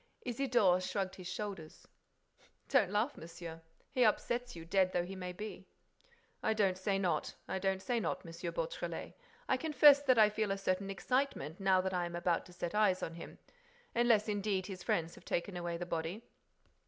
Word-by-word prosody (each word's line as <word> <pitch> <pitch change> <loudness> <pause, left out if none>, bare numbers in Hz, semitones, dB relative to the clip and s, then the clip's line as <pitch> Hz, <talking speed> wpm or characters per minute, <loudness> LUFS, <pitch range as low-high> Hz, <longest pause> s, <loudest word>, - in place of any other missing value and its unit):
Isidore 240 -7 +3
shrugged 190 0 -2
his 185 -2 -7
shoulders: 180 -4 -6 0.8
"Don't 245 -9 +4
laugh, 215 +8 0
monsieur. 165 0 -8 0.3
He 250 - +3
upsets 240 +2 +1
you, 165 -1 -8
dead 185 +1 +2
though 175 0 +1
he 190 +2 -7
may 180 -1 -5
be." 210 +4 -7 0.7
"I 220 - +1
don't 195 -4 +2
say 195 0 +1
not, 175 -5 -1
I 190 - -2
don't 190 0 0
say 245 -2 0
not, 210 - -2
M. 165 - -8 0.2
Beautrelet, - - -4 0.3
I 260 - +2
confess 290 -1 +6
that 260 -4 +4
I 215 -1 +6
feel 215 -1 -1
a 195 - 0
certain 195 0 -1
excitement 250 - -1
now 190 -1 +4
that 190 0 -2
I 180 -1 0
am 170 - -6
about 175 0 0
to - - -14
set 175 -1 -4
eyes 210 -3 +3
on 165 - -3
him—unless, 355 - -2
indeed, 200 -2 0
his 185 -2 -7
friends 165 -1 0
have - - -14
taken 180 +2 -2
away 175 -1 -3
the 175 - -4
body." 170 +6 -3
195 Hz, 180 wpm, -34 LUFS, 180-230 Hz, 0.8 s, confess